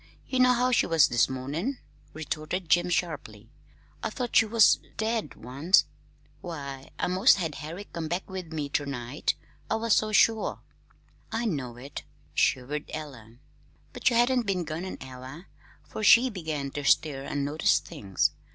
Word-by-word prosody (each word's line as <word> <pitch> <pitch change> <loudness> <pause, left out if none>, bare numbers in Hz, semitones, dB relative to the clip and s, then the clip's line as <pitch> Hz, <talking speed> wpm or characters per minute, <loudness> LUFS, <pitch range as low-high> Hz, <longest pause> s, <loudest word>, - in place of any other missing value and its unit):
You 260 - -2
know 250 0 +6
how 250 +1 +2
she 245 - +3
was 165 -3 +5
this 120 +1 +3
mornin'," 145 - -3 0.3
retorted 155 +3 -4
Jim 175 0 +4
sharply. 135 - -3 0.5
"I - - -2
thought 245 -3 -4
she 225 - +6
was 225 0 +5 0.2
dead 220 +1 -2
once. 140 - +2 0.5
Why, 140 -6 -7
I - - 0
'most 185 +2 +5
had 165 -6 -2
Herrick 165 +8 -8
come 165 -1 -3
back 175 +4 -3
with 185 -3 -7
me 150 -3 -3
ter 145 +1 -1
night, 130 +1 -2 0.3
I - - +1
was 225 -1 +2
so 215 0 +1
sure." 220 +1 +3 0.7
"I 225 +2 -1
know 130 - -3
it," 135 +3 -8 0.3
shivered 140 +4 0
Ella, 130 -8 -8 0.6
"but - - +2
you 240 - -1
hadn't 240 -1 +3
been 185 -3 0
gone 160 +3 -5
an 185 - -6
hour 130 +6 -9 0.4
'fore - - -6
she 245 +4 +7
began 155 -7 -4
to 145 - -5
stir 135 0 +2
an' 140 0 -2
notice 150 +3 +2
things. 95 -2 -1
160 Hz, 165 wpm, -27 LUFS, 140-210 Hz, 0.7 s, she